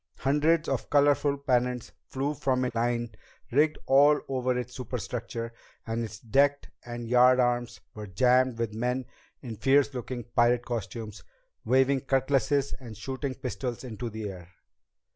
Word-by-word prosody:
Hundreds 155 +4 +2
of 135 -3 -2
colorful 145 0 +3
pennants 125 -3 0 0.2
flew 140 +3 -2
from 130 -2 0
lines 120 0 -1 0.4
rigged 150 +4 +3
all 145 +2 +5
over 130 -1 0
its 125 0 -5
superstructure, 115 -2 -5 0.3
and 115 +1 -2
its 110 -2 -7
decks 140 +6 +1
and 120 -1 -6
yardarms 125 0 +3
were 105 -1 -8
jammed 125 +5 +3
with 115 -2 -2
men 125 +3 -1 0.4
in 115 -4 -6
fierce 135 +5 +3
looking 125 -1 -5
pirate 120 0 +3
costumes, 115 -2 -5 0.4
waving 130 +1 +3
cutlasses 135 +1 +1
and 115 -5 -10
shooting 130 +3 -4
pistols 125 -1 -4
into 120 -1 -5
the 110 -1 -5
air. 90 -3 -9
125 Hz, 135 wpm, -28 LUFS, 115-135 Hz, 0.4 s, all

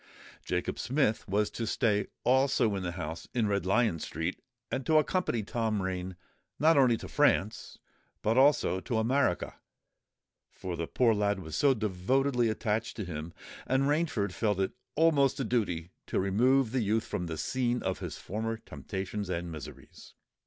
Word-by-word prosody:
Jacob - - -2
Smith 130 -4 0
was 105 +2 +1
to 115 - -4
stay 105 -3 +1 0.2
also 130 -4 +3
in 95 - -2
the 85 -2 -3
house 80 -1 -6
in 115 -3 +2
Red 100 -3 0
Lion 105 -4 +2
Street, 80 +4 -4 0.3
and 135 - -1
to 155 +4 +3
accompany 155 - +1
Tom 110 0 -1
Rain 95 -1 -3 0.4
not 160 +2 +5
only 125 -5 +5
to - - -8
France, 105 +4 +1 0.5
but 110 +2 +2
also 135 -7 +4
to 115 +4 -2
America; 115 -3 +1 0.9
for 90 -2 -6
the 85 0 -3
poor 115 - +3
lad 105 -1 +1
was 80 -4 -5
devotedly 125 +1 +2
attached 110 0 -1
to 105 - -3
him, 80 -1 -6 0.4
and 130 +1 +2
Rainford 145 - 0
felt 105 -2 0
it 95 - +1 0.2
almost 145 -4 +3
a - - 0
duty 95 -8 -1 0.2
to - - 0
remove 115 +6 +3
the 130 0 +1
youth 110 +1 +1
from 90 - -3
the 80 -1 -4
scene 125 +5 -1
of 95 0 -2
his - - -6
former 110 +3 -3
temptations 100 -2 -5
and 85 -1 -3
miseries. 75 -5 -11
110 Hz, 160 wpm, -30 LUFS, 95-125 Hz, 0.9 s, not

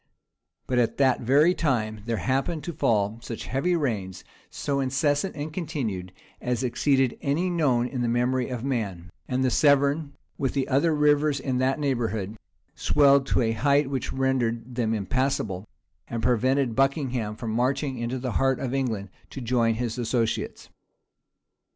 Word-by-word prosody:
But 125 -1 +1
at 120 - +1
that 135 -2 +3
very 145 +8 +4
time 110 -10 -1
there 115 -1 0
happened 135 +6 -1
to 170 - -4
fall 105 -4 +1
such 115 - -6
heavy 170 +8 0
rains, 100 - -2 0.3
so 140 -1 -2
incessant 145 +6 0
and 150 +1 -5
continued, 130 - -3 0.3
as 125 0 -1
exceeded 130 +1 +1
any 165 +6 0
known 135 -8 +2
in 125 -1 -4
the 120 - +1
memory 125 +2 +1
of 125 -2 -4
man; 100 -10 -3 0.2
and 130 0 0
the 130 - +2
Severn, 140 +1 +3 0.3
with 135 0 -1
the 135 -1 0
other 145 +4 +2
rivers 150 -1 +3
in 130 -2 -1
that 130 +1 +1
neighborhood, 115 -8 -1 0.4
swelled 140 -2 +4
to - - +2
a 115 - +1
height 140 +4 +2
which 135 - -2
rendered 125 -2 -1
them 115 -2 0
impassable, 110 -2 -1 0.4
and 115 -1 -4
prevented 125 +1 +2
Buckingham 130 -5 0
from 115 -1 -4
marching 130 +3 0
into 120 +2 -2
the 125 -1 -3
heart 135 +2 +2
of 130 -1 -3
England 115 -8 -2 0.2
to - - -7
join 115 -2 +1
his 120 0 -3
associates. 115 -1 -1
130 Hz, 155 wpm, -26 LUFS, 115-140 Hz, 0.4 s, very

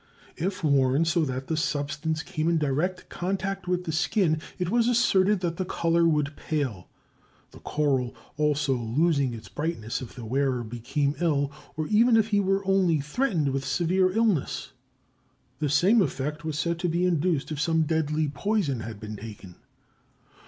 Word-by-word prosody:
If 185 +2 -3
worn 140 +1 +3
so 170 0 +2
that 130 -1 -4
the 160 - -2
substance 150 +1 -2
came 170 -3 -1
in 170 - +2
direct 155 +5 -1
contact 195 +1 -3
with 180 0 0
the 165 - -3
skin, 160 0 +1 0.2
it 180 -1 -2
was 235 0 +3
asserted 210 -5 +3
that 170 -2 -2
the 185 - 0
color 170 -2 +2
would 150 -2 +1
pale, 130 - -3 0.6
the - - -14
coral 135 -5 0 0.2
also 150 -2 +1
losing 135 +2 +1
its 110 -1 -10
brightness 145 -8 -3
if 125 - -9
the 120 -3 -8
wearer 130 +1 0
became 120 +5 -1
ill, 145 -5 +1 0.3
or 155 - -1
even 225 +5 +4
if 220 0 +2
he 205 -2 +3
were 195 0 +1
only 190 -5 +3
threatened 160 - 0
with 135 0 -2
severe 175 +7 +2
illness. 210 - 0 0.9
The 150 -2 0
same 185 - +4
effect 150 -1 -2
was 155 -2 -3
said 170 +2 -1
to 175 -1 0
be 170 +2 +1
induced 170 -3 0
if 150 -1 -2
some 160 0 +2
deadly 155 -1 0
poison 145 - -1
had 110 -2 -7
been 105 0 -7
taken. 105 -4 -10
155 Hz, 165 wpm, -26 LUFS, 140-180 Hz, 0.9 s, even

